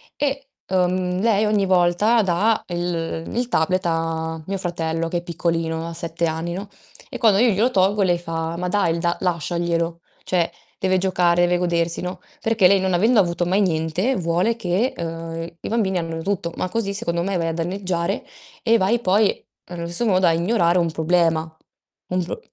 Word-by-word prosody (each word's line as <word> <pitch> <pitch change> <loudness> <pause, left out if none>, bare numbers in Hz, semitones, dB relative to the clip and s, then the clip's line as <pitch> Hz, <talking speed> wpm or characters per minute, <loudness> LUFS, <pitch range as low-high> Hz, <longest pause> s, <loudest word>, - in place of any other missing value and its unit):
e, 275 -1 -2 0.2
uhm, 180 0 +1
lei 215 -1 +3
ogni 210 -2 +2
volta 185 +5 +3
dà 200 +5 +1
el 175 -2 -3
il 245 +1 0
tablet 185 +1 +1
a 165 -1 -2
mio 195 0 -2
fratello 165 -2 -2
che 175 - -1
è - - -2
piccolino, 165 -1 -2
ha 170 - -6
7 170 +1 -2
anni, 165 +1 -2
no, 200 +3 -6 0.4
e - - -7
quando 220 -5 +4
io 240 0 +5
glielo 215 +5 +2
tolgo 195 0 +2
lei 180 -2 +3
fa: 165 -1 -4
"Ma 180 +1 -2
dai, 180 -3 +1
l - - -3
da 170 +1 0
lasciaglielo, 170 -1 -1 0.2
cioè 170 -2 0 0.3
deve 185 0 +2
giocare, 180 -2 +2
deve 175 0 +3
godersi" 170 -1 0
no, 180 0 -5 0.2
perché 225 -4 +4
lei 195 +1 +4
non 190 0 0
avendo 220 +6 +4
avuto 175 -1 +1
mai 190 +4 +2
niente 175 +7 0
vuole 180 +5 +1
che, 220 +4 0
uhm, 165 0 -5
i - - -5
bambini 200 -5 +1
abbiano 165 -1 -4
tutto, 180 -3 -2
ma - - -1
così 205 -1 -2
secondo 170 -4 -2
me 195 0 -1
vai 165 -1 -1
a 165 - -1
danneggiare 175 0 -2 0.4
e 230 0 +4
vai 225 +4 +2
poi, 205 0 +2 0.2
allo 170 -1 -6
stesso 175 +8 0
modo, 185 -4 +3
a 165 - +4
ignorare 170 0 +2
un 170 -1 0
problema, 160 -1 +1 0.5
un 180 0 0
pro 170 - -5
175 Hz, 185 wpm, -22 LUFS, 170-195 Hz, 0.5 s, io